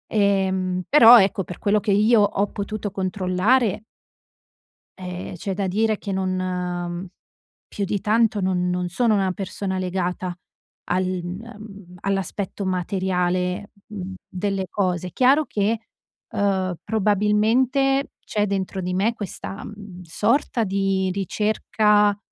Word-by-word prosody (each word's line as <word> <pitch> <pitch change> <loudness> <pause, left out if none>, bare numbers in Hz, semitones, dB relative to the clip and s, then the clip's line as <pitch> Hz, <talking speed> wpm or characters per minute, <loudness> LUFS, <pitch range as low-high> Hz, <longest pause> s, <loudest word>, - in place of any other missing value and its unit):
Ehm, 190 -3 +1
però, 245 -4 +9
ecco, 195 0 +1
per 180 - -8
quello 210 +1 +2
che 205 0 -1
io 215 +3 +4
ho 205 0 +1
potuto 205 0 -4
controllare 190 +4 +1 1.1
ehm, 180 -1 -6
c'è 195 +3 -4
da 195 0 -2
dire 215 +3 +1
che 200 - -6
non, 190 -1 -1
mhmm, 180 -1 -3 0.6
più 200 - -3
di 200 +1 -1
tanto 215 -1 +2
non 180 -1 0
non 180 0 -1
sono 225 +5 +2
una 195 -2 +1
persona 190 0 -4
legata 180 -1 -2 0.5
al 185 +1 0 0.2
mhmm, 200 -1 -9
all'aspetto 195 +1 -2
materiale, 180 +1 -1 0.2
mhmm, 195 -3 -6
delle 195 +1 -2
cose, 180 -3 -1
chiaro 270 - +4
che, 215 -1 0 0.5
uhm, 190 -3 0
probabilmente 220 +6 +2
c'è 210 -1 0
dentro 190 -1 -2
di 180 0 -3
me 200 +5 +1
questa, 200 -1 -7
mhmm, 200 -4 -10
sorta 230 - +1
di 195 -1 0
ricerca 210 +1 +2
195 Hz, 125 wpm, -23 LUFS, 185-210 Hz, 1.1 s, però